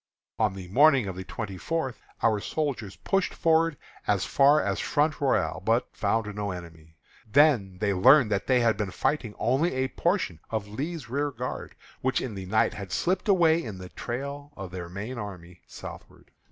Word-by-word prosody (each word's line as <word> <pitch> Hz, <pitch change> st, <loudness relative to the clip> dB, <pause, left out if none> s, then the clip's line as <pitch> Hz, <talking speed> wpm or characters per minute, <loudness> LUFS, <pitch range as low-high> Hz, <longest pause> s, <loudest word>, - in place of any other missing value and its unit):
On 95 Hz, -, +2 dB
the 95 Hz, -2 st, -8 dB
morning 135 Hz, +2 st, +5 dB
of 95 Hz, -2 st, -4 dB
the 95 Hz, -, -6 dB
twenty 100 Hz, -1 st, -6 dB
fourth 160 Hz, -7 st, -2 dB, 0.2 s
our 110 Hz, -2 st, +3 dB
soldiers 120 Hz, -7 st, -3 dB
pushed 195 Hz, -1 st, -1 dB
forward 165 Hz, -2 st, +2 dB, 0.3 s
as 100 Hz, -2 st, +2 dB
far 145 Hz, +2 st, +5 dB
as 100 Hz, -6 st, -1 dB
Front 150 Hz, +1 st, +1 dB
Royal, 135 Hz, -8 st, +1 dB
but 115 Hz, +4 st, +1 dB
found 105 Hz, +1 st, 0 dB
no 105 Hz, -1 st, -2 dB
enemy. 80 Hz, -3 st, -9 dB, 0.3 s
They 140 Hz, +5 st, +7 dB
then 100 Hz, -12 st, +1 dB
learned 110 Hz, +5 st, +5 dB
that 100 Hz, -1 st, 0 dB
they 125 Hz, -2 st, +4 dB
had 115 Hz, -3 st, +3 dB
been 105 Hz, -2 st, -2 dB
fighting 115 Hz, +3 st, -1 dB
only 135 Hz, +6 st, +1 dB
a 130 Hz, 0 st, 0 dB
portion 170 Hz, -, 0 dB
of 110 Hz, -2 st, -2 dB
Lee's 145 Hz, +8 st, -5 dB
rearguard, 130 Hz, -1 st, -3 dB, 0.3 s
which 130 Hz, 0 st, +1 dB
in 125 Hz, -, -4 dB
the 95 Hz, -2 st, -7 dB
night 110 Hz, +3 st, +2 dB
had 100 Hz, -3 st, -7 dB
slipped 185 Hz, -, 0 dB
away 170 Hz, -4 st, +4 dB
in 105 Hz, -5 st, -6 dB
the 90 Hz, 0 st, -9 dB
trail 140 Hz, +7 st, -5 dB
of 95 Hz, -3 st, -7 dB
their 90 Hz, -2 st, -6 dB
main 105 Hz, +7 st, -5 dB
army 90 Hz, -4 st, -8 dB
southward. -, -, -11 dB
115 Hz, 180 wpm, -27 LUFS, 95-145 Hz, 0.3 s, They